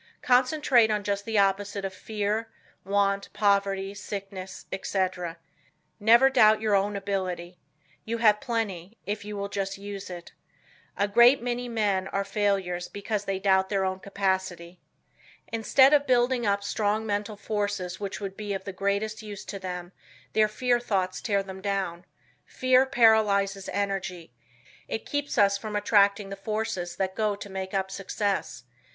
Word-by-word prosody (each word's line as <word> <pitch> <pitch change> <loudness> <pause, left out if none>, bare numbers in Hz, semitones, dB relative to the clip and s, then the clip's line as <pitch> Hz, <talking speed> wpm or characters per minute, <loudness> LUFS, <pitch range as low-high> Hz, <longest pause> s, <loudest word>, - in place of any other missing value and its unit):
Concentrate 255 -2 +4
on 210 -1 0
just 200 0 -2
the 225 -1 -1
opposite 200 0 +1
of 190 - -4
fear, 215 +3 -2 0.3
want, 200 0 0
poverty, 200 -1 +1
sickness, 195 -1 -7
etc. 185 -3 -2 0.6
Never 235 +5 +6
doubt 215 -4 +6
your 215 -1 0
own 200 +1 +2
ability. 185 -3 -3 0.4
You 230 +1 -3
have 215 -2 +4
plenty, 225 -5 -3
if 205 0 -3
you 210 0 -6
will 200 0 -3
just 195 -1 -3
use 200 -1 -7
it. 175 -1 -9 0.7
A 200 - +2
great 240 +5 +6
many 245 0 -2
men 205 -5 0
are 195 +1 -1
failures 195 -3 -1
because 205 0 -3
they 195 -1 -1
doubt 190 -1 +2
their 195 -2 +1
own 190 0 -2
capacity. 190 -3 -2 0.7
Instead 265 +5 +4
of 285 -1 +4
building 245 -2 +2
up 200 0 +1
strong 210 +1 0
mental 205 0 -2
forces 205 -3 -3
which 200 -2 -4
would 195 -2 -5
be 205 -1 -4
of 190 - -5
the 195 - -6
greatest 200 +3 -1
use 210 -2 -8
to 200 - -6
them 180 -1 -6 0.4
their 215 -1 +4
fear 245 +3 +1
thoughts 190 -6 -1
tear 200 -3 0
them 190 0 -9
down. 190 -3 -2 0.4
Fear 255 +1 +3
paralyzes 210 -6 +3
energy. 190 -7 -3 0.5
It 220 - -4
keeps 290 0 -3
us 200 -1 +4
from 215 -1 -5
attracting 200 -1 +3
the 195 - -5
forces 195 -4 -3
that 190 -1 -1
go 210 0 0
to 200 0 -9
make 190 0 -5
up 190 0 -1
success. 195 - -2
200 Hz, 155 wpm, -27 LUFS, 190-215 Hz, 0.7 s, Never